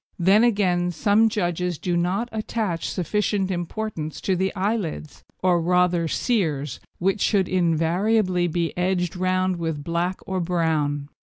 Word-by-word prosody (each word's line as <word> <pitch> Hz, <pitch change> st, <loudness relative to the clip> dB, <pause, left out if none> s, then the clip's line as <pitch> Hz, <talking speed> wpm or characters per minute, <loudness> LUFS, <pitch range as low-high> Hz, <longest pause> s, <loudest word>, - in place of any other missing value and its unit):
Then, 195 Hz, +5 st, +4 dB
again, 185 Hz, -6 st, +2 dB
some 205 Hz, +6 st, +3 dB
judges 180 Hz, -4 st, -1 dB
do 175 Hz, +2 st, -2 dB
not 185 Hz, +7 st, 0 dB
attach 215 Hz, -5 st, -2 dB
sufficient 195 Hz, +1 st, -1 dB
importance 175 Hz, -3 st, -4 dB
to 190 Hz, -, +1 dB
the 190 Hz, +2 st, 0 dB
eyelids, 190 Hz, -7 st, -3 dB, 0.2 s
or 180 Hz, -2 st, +3 dB
rather 180 Hz, -1 st, +2 dB
sears, 155 Hz, -, -1 dB, 0.2 s
which 195 Hz, +3 st, 0 dB
should 195 Hz, -4 st, +2 dB
invariably 180 Hz, +2 st, +1 dB
be 170 Hz, 0 st, -2 dB
edged 180 Hz, -1 st, 0 dB
round 185 Hz, 0 st, 0 dB
with 160 Hz, -3 st, -3 dB
black 170 Hz, +3 st, -1 dB
or 190 Hz, -1 st, -2 dB
brown. 160 Hz, -5 st, 0 dB
180 Hz, 135 wpm, -23 LUFS, 170-195 Hz, 0.2 s, Then